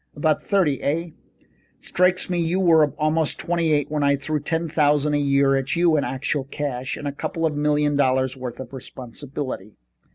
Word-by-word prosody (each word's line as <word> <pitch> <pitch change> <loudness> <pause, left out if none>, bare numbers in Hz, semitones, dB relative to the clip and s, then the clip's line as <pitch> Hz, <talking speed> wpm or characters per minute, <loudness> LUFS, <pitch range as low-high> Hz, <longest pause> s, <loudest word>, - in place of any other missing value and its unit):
"About 155 0 +1
thirty, 180 -9 +1
eh? 165 +4 -1 0.7
Strikes 180 +1 +1
me 180 -1 -1
you 170 +2 0
were 165 -4 +5
about 155 +1 +1
twenty 170 -2 0
eight 145 -1 +1
when 150 -1 -1
I 140 0 +3
threw 150 +2 -2
ten 165 +3 -2
thousand 150 -1 +2
a 145 - +2
year 140 -1 +3
at 135 +4 -1
you 170 -2 +3
in 145 - +1
actual 135 +1 -2
cash, 135 -3 -4
and 145 - -5
a - - -1
couple 165 +3 -3
of 155 -2 0
million 150 0 +1
dollars' 130 -1 +1
worth 125 -2 -7
of 130 0 -8
responsibility." 130 -3 -7
145 Hz, 185 wpm, -23 LUFS, 135-160 Hz, 0.7 s, were